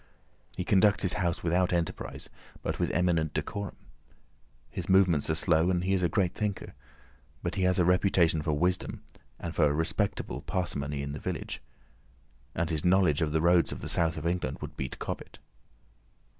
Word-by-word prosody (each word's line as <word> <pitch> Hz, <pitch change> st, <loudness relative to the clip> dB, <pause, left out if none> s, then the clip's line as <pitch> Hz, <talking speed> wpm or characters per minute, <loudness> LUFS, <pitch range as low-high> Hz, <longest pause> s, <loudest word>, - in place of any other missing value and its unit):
He 90 Hz, -, -1 dB
conducts 100 Hz, 0 st, +4 dB
his 95 Hz, -, +1 dB
house 90 Hz, -4 st, -1 dB
without 90 Hz, +2 st, +2 dB
enterprise, 85 Hz, -2 st, -2 dB, 0.4 s
but -, -, -2 dB
with -, -, +1 dB
eminent 85 Hz, -3 st, +1 dB
decorum. 100 Hz, 0 st, -3 dB, 1.0 s
His -, -, -4 dB
movements 90 Hz, -6 st, +4 dB
are 80 Hz, -, +2 dB
slow, 85 Hz, -1 st, +3 dB
and 90 Hz, -1 st, +1 dB
he 95 Hz, +1 st, +1 dB
is 95 Hz, -, +2 dB
a 85 Hz, -, +2 dB
great 95 Hz, -4 st, +1 dB
thinker. 105 Hz, -2 st, -3 dB, 0.7 s
But -, -, -2 dB
he 95 Hz, -, -2 dB
has 90 Hz, -1 st, +3 dB
a 90 Hz, -, +3 dB
reputation 90 Hz, -3 st, +3 dB
for 75 Hz, 0 st, 0 dB
wisdom 90 Hz, +5 st, 0 dB, 0.3 s
and 85 Hz, -2 st, -5 dB
for 75 Hz, -, +4 dB
a 75 Hz, -, +2 dB
respectable 80 Hz, +1 st, -1 dB
parsimony 75 Hz, -6 st, -2 dB
in 70 Hz, -, -4 dB
the 75 Hz, -, -5 dB
village, -, -, -4 dB, 0.9 s
and 85 Hz, 0 st, -1 dB
his 75 Hz, -2 st, -1 dB
knowledge 90 Hz, -5 st, +3 dB
of 80 Hz, -2 st, +1 dB
the 80 Hz, +1 st, +1 dB
roads 85 Hz, 0 st, +4 dB
of -, -, -6 dB
the -, -, -4 dB
South 80 Hz, -1 st, +1 dB
of 80 Hz, -, -5 dB
England 85 Hz, -6 st, -1 dB
would -, -, -7 dB
beat 65 Hz, -1 st, -5 dB
Cobbett. -, -, -6 dB
85 Hz, 180 wpm, -29 LUFS, 80-90 Hz, 1.0 s, conducts